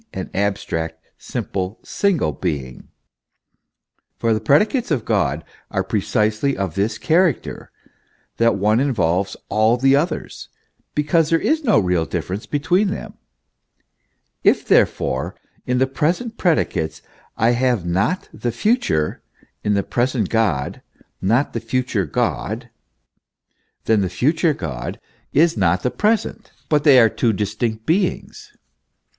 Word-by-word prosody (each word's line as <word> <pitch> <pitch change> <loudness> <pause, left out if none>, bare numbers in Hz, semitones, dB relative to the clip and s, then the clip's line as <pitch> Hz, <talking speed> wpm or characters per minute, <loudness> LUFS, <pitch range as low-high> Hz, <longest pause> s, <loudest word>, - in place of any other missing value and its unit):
an - - -5
abstract, 80 -5 -2 0.2
simple, 95 +2 -4
single 190 - 0
being; 70 -4 -4 1.3
for 115 -1 +1
the 110 - 0
predicates 180 - +2
of 140 -8 0
God - - 0 0.3
are - - -1
precisely 110 +6 0
of 95 -4 -2
this 100 +5 -1
character, 165 -3 0 0.7
that 115 0 +3
one 105 +3 +2
involves 100 -8 0
all 110 +3 +3
the 135 +2 +4
others, 155 +3 -2 0.5
because 150 +2 +2
there 165 - +4
is 310 - 0
no 220 -7 +4
real 90 -4 +1
dif - - -3
ference 95 +4 -5
between 175 +8 +2
them. 195 - -5 1.3
If, - - +3
therefore, 65 0 +1 0.3
in 125 0 +1
the 130 - +3
present 170 - -1
predicates 80 - 0 0.3
I 115 +1 +3
have 120 -6 +1
not 95 - 0
the 120 - -3
future, 120 - 0 0.4
in 105 0 +1
the 100 - +1
present 125 +2 0
God 100 -13 0 0.4
not 115 +9 +1
the 115 - -2
future 115 -4 -1
God, - - -2 1.1
then 110 -2 +3
the 95 - -1
future 150 - +1
God 65 - -5 0.3
is 165 +3 +3
not 85 +2 +1
the 125 - 0
present, 215 +1 -1 0.2
but 150 -2 +2
they 135 -4 +8
are 115 - +7
two 110 +1 0
dis 105 0 -2
tinct 110 0 -2
beings. 205 - -1
115 Hz, 130 wpm, -20 LUFS, 95-150 Hz, 1.3 s, they